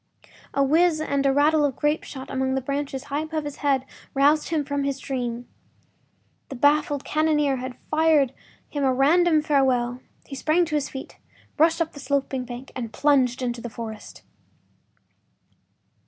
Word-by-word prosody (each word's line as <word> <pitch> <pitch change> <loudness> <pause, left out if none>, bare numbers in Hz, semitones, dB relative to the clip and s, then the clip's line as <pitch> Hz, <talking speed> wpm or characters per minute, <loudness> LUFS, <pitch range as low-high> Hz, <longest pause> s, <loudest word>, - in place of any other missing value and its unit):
A 275 - +3
whiz 320 +3 +3
and 280 -3 0
a - - +4
rattle 295 +2 +3
of 280 -3 +1
grapeshot 295 -3 -2
among 265 0 0
the 265 - 0
branches 275 0 -3
high 285 0 -3
above 315 0 -3
his 290 -1 -6
head 275 -2 +1 0.3
roused 290 +3 +3
him 310 -3 0
from 285 0 -2
his 275 -1 -1
dream. 245 -3 -4 1.0
The 270 - -6
baffled 290 +1 +2
cannoneer 300 -3 +1
had 255 0 -6
fired 305 -4 +3 0.3
him 290 -1 -3
a 265 - +3
random 310 +4 +3
farewell. 255 -4 +1 0.2
He - - -11
sprang 315 +5 +2
to 320 - -7
his 290 -2 -1
feet, 265 - -9 0.4
rushed 330 +2 +4
up 320 - -12
the 285 - -10
sloping 275 -2 -1
bank, 245 +2 -8
and 235 -4 -5
plunged 260 -3 +2
into 240 -1 -2
the 240 - -6
forest. 220 -2 -8
280 Hz, 160 wpm, -24 LUFS, 260-300 Hz, 1.0 s, a